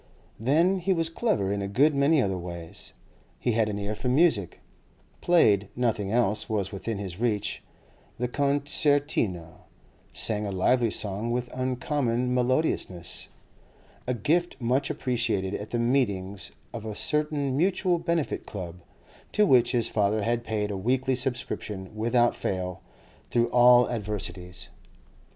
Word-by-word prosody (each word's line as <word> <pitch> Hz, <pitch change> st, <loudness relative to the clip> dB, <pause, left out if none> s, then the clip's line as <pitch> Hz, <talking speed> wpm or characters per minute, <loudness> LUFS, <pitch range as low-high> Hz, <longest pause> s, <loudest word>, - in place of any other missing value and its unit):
Then 165 Hz, -, +3 dB
he 190 Hz, +2 st, +1 dB
was 165 Hz, -2 st, 0 dB
clever 165 Hz, -, 0 dB
in 100 Hz, -, -2 dB
a 100 Hz, -, -2 dB
good 140 Hz, +10 st, +3 dB
many 140 Hz, +1 st, +3 dB
other 95 Hz, -2 st, -1 dB
ways. 85 Hz, -2 st, -7 dB, 0.5 s
He 120 Hz, -, 0 dB
had 110 Hz, -1 st, +1 dB
an 100 Hz, -, -3 dB
ear 100 Hz, +1 st, -3 dB
for 125 Hz, +4 st, -3 dB
music, 130 Hz, -, +2 dB, 0.6 s
played 105 Hz, -, +4 dB
(nothing 110 Hz, -5 st, 0 dB
else 115 Hz, -3 st, +1 dB
was 100 Hz, -4 st, -1 dB
within 105 Hz, +2 st, -4 dB
his 95 Hz, -2 st, -6 dB
reach) 105 Hz, -4 st, -1 dB, 0.6 s
the 125 Hz, -, -1 dB
concertina, 140 Hz, -, +1 dB, 0.5 s
sang 105 Hz, -2 st, 0 dB
a -, -, -3 dB
lively 115 Hz, +6 st, +2 dB
song 105 Hz, +2 st, -2 dB
with 120 Hz, +1 st, -2 dB
uncommon 125 Hz, -1 st, -1 dB
melodiousness—a 125 Hz, -, -3 dB
gift 170 Hz, +7 st, 0 dB
much 130 Hz, +3 st, +1 dB
appreciated 115 Hz, -7 st, -1 dB
at 105 Hz, -, -5 dB
the 120 Hz, -, -1 dB
meetings 100 Hz, -6 st, 0 dB, 0.2 s
of 115 Hz, -3 st, -6 dB
a 110 Hz, -2 st, -5 dB
certain 150 Hz, -2 st, 0 dB
Mutual 180 Hz, +2 st, +2 dB
Benefit 170 Hz, -3 st, -1 dB
Club, 90 Hz, -4 st, -6 dB, 0.6 s
to 210 Hz, -, +4 dB
which 130 Hz, -9 st, +4 dB
his 120 Hz, -2 st, +1 dB
father 105 Hz, 0 st, +1 dB
had 120 Hz, +1 st, 0 dB
paid 105 Hz, -2 st, -2 dB
a 100 Hz, -, -3 dB
weekly 130 Hz, +6 st, +1 dB
subscription, 120 Hz, -6 st, -3 dB
without 120 Hz, +2 st, +2 dB
fail, 90 Hz, -1 st, -3 dB, 0.5 s
through 120 Hz, 0 st, +2 dB
all 125 Hz, 0 st, +7 dB
adversities. 95 Hz, -4 st, -4 dB
120 Hz, 135 wpm, -27 LUFS, 100-135 Hz, 0.6 s, all